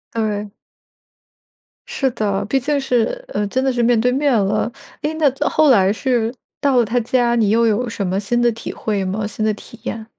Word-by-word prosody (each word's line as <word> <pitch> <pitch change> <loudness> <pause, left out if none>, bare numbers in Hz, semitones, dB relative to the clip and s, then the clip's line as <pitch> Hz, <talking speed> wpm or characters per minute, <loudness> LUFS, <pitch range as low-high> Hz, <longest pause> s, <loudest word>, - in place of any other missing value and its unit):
对。 210 -2 -2 1.4
是 270 - 0
的。 205 -3 -1
毕 270 +6 +1
竟 285 +3 0
是， 270 - 0
呃， 210 - -1
真 260 +6 -1
的 265 - +2
是 240 -1 0
面 235 -1 +3
对 250 +2 +2
面 280 +2 +1
了， 210 +3 0 0.3
诶， 300 +1 -1
那 310 -3 +3 0.2
后 310 -1 +3
来 195 -6 +5
是 235 0 0 0.3
到 275 -3 +2
了 240 - +4
他 245 +3 0
家， 240 0 +1
你 220 -4 +2
又 230 +2 +3
有 230 +2 +1
什 205 -3 -3
么 190 +1 0
新 240 +4 0
的 240 0 +3
体 230 0 -7
会 205 -3 -2
吗？ 195 +3 -2
新 215 +1 -3
的 215 - +2
体 220 +2 -13
验？ 225 -2 -5
230 Hz, 220 characters per minute, -19 LUFS, 210-255 Hz, 1.4 s, 来